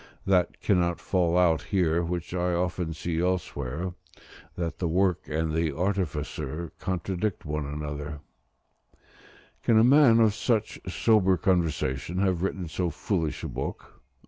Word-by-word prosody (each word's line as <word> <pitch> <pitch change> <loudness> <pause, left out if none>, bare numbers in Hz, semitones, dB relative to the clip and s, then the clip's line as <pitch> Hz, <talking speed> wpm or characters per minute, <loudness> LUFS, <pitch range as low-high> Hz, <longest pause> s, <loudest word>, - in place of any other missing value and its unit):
That 90 -2 +2
cannot 90 -4 +2
fall 90 -2 +1
out 85 -4 +4
here, 85 -4 +1
which 85 0 -4
I 90 0 0
often 90 -1 -1
see 80 +1 -3
elsewhere, 90 -2 -2 0.6
that 85 -2 -3
the 90 - 0
work 90 +1 +1
and 80 +1 -1
the 80 -1 +1
artificer 80 -4 -2
contradict 95 +1 -2
one 75 -1 -3
another: 75 0 -5 1.4
"Can 115 - +3
a 110 - +6
man 130 -2 +6
of 110 -2 +5
such 110 -1 0
sober 95 -1 +3
conversation 85 -4 0
have 95 -3 +1
written 95 -2 -2
so 85 +2 -1
foolish 80 0 -2
a - - -2
book?" - - -6
90 Hz, 135 wpm, -27 LUFS, 80-95 Hz, 1.4 s, a